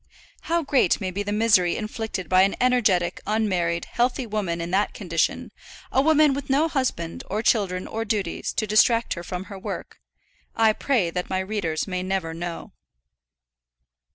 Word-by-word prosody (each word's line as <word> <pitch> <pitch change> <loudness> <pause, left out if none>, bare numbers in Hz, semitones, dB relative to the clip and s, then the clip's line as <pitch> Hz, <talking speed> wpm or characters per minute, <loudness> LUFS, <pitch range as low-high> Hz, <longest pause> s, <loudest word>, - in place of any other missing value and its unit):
How 335 0 +2
great 270 - +2
may 190 -3 -3
be 195 +3 -3
the 205 0 -3
misery 210 -5 +3
inflicted 215 -4 -4
by 185 +2 +5
an 195 +1 +3
energetic, 220 -9 +2
unmarried, 180 -6 0
healthy 250 +1 0
woman 205 -6 -2
in 170 +1 -4
that 200 +3 +1
condition, 170 -5 -1 0.4
a 265 - +3
woman 305 -1 +4
with 275 0 -5
no 285 +4 +3
husband, 255 - -2
or 210 +3 -2
children, 190 -6 +1
or 225 +1 -3
duties, 205 -5 -2
to 220 - -1
distract 230 +2 +3
her 170 - -6
from 180 +1 -5
her 195 0 -9
work - - -7 0.6
I 220 -1 +4
pray 215 -9 0
that 180 +1 -4
my 190 - 0
readers 190 -5 -2
may 185 -1 -2
never 185 -3 -2
know. 170 0 -6
205 Hz, 165 wpm, -24 LUFS, 180-230 Hz, 0.6 s, by